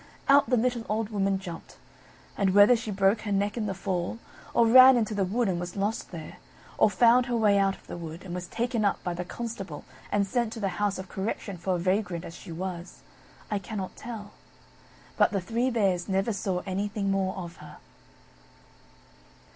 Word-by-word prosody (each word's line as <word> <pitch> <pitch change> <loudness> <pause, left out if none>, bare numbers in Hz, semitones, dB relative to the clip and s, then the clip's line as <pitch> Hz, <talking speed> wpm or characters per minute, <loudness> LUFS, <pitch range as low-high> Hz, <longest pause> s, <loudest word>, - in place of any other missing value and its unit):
Out 275 -3 +5
the 250 - +3
little 240 0 0
old 215 0 -1
Woman 195 -2 0
jumped; 175 -4 -9 0.6
and 195 -1 +1
whether 205 +4 +8
she 225 -1 -5
broke 195 +1 +2
her 210 - -4
neck 200 +1 0
in 220 -3 -2
the 195 - -3
fall; 185 +2 -2 0.3
or 235 - +4
ran 255 +2 +9
into 220 -2 0
the 200 -1 +1
wood 220 +5 0
and 180 -2 0
was 175 0 -6
lost 205 +2 -2
there; 160 -3 -9 0.4
or - - +6
found 240 +5 +4
her 240 -1 0
way 205 -3 +4
out 195 0 +2
of - - -21
the - - -7
wood, 165 0 -8
and 180 -2 -7
was 180 0 -5
taken 235 +1 -1
up 200 - 0
by 175 - -2
the 175 +1 -4
constable 195 -6 -6 0.3
and 205 -1 +2
sent 235 +2 -1
to 230 - -7
the 200 -2 0
House 205 -1 +1
of 190 0 -7
Correction 195 +1 -4
for 180 +2 -1
a - - 0
vagrant 180 -1 -1
as 165 - -8
she 180 - -10
was, 175 +1 -6 0.5
I 205 - 0
cannot 195 -2 -6
tell. 220 -3 -8 0.9
But - - +5
the 200 - +1
Three 230 +7 -1
Bears 195 -6 0
never 195 +4 +1
saw 190 -2 -2
anything 200 +1 -2
more 190 -1 0
of 175 -2 -7
her. - - -12
200 Hz, 200 wpm, -27 LUFS, 185-225 Hz, 0.9 s, ran